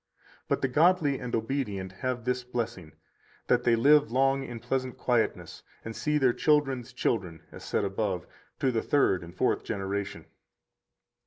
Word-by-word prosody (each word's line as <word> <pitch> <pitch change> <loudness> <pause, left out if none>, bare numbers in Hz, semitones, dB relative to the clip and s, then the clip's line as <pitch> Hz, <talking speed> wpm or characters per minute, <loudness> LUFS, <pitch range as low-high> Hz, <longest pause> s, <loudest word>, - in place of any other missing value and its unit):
But - - -1
the - - +4
godly 150 0 +3
and 125 -2 -3
obedient 110 -6 -2
have 125 +5 -3
this 125 0 0
blessing, 115 -9 -4 0.5
that 125 0 +2
they 120 - +5
live 145 +4 +5
long 135 +2 +2
in 120 -3 -7
pleasant 130 +2 -2
quietness, 120 -3 -1 0.2
and 115 0 -6
see 150 0 0
their 130 -4 +3
children's 135 -5 +1
children 90 -9 -2
(as - - -11
said - - -1
above) 95 -2 -2 0.4
to 130 - +3
the 115 -2 0
third 115 -11 +2
and 85 +2 -12
fourth - - +1
generation. 100 0 -4
125 Hz, 155 wpm, -28 LUFS, 100-135 Hz, 0.5 s, they